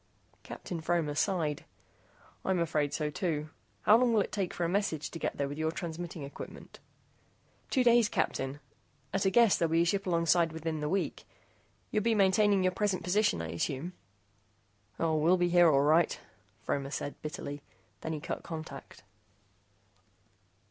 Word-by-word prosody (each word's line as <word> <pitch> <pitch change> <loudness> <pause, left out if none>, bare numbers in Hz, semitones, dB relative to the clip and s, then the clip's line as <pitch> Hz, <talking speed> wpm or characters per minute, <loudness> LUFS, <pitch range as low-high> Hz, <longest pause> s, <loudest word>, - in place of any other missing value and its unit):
Captain 170 -3 -7
Fromer 165 -3 0
sighed. 155 -3 0 0.8
"I'm 190 -1 +1
afraid 150 -4 0
so, 150 -1 -2
too. 155 -3 -2 0.3
How 215 - +7
long 245 0 +3
will 215 - +4
it - - -3
take 195 -4 -2
for 175 - -3
a - - +2
message 175 -5 -1
to 165 - -7
get - - -2
there 140 - 0
with 145 +2 -6
your 160 0 +1
transmitting 170 -2 -6
equipment?" 140 - -10 0.9
"Two 260 - +2
days, 235 -2 +5
Captain. 135 +2 -1 0.5
At 195 - 0
a - - +5
guess, 230 0 +5
there'll 165 -1 +1
be 165 +1 +4
a - - 0
ship 195 +3 0
alongside 170 -1 +2
within 160 0 -3
the 150 0 -2
week. 195 +3 -2 0.7
You'll 215 - +1
be 230 +1 +2
maintaining 200 0 +4
your 185 - +3
present 195 -2 -1
position, 180 - +1
I 80 - -5
assume?" 140 - -3 1.1
"Oh, 160 -1 +1
we'll 165 +4 +4
be 175 0 +2
here, 175 -1 +6
all 140 -2 +4
right," 155 +3 +3 0.4
Fromer 140 -1 -2
said 145 0 -5
bitterly. 145 -2 -6 0.4
Then 160 - -4
he 155 - -3
cut - - -4
contact. 160 -1 -8
170 Hz, 165 wpm, -31 LUFS, 150-190 Hz, 1.1 s, How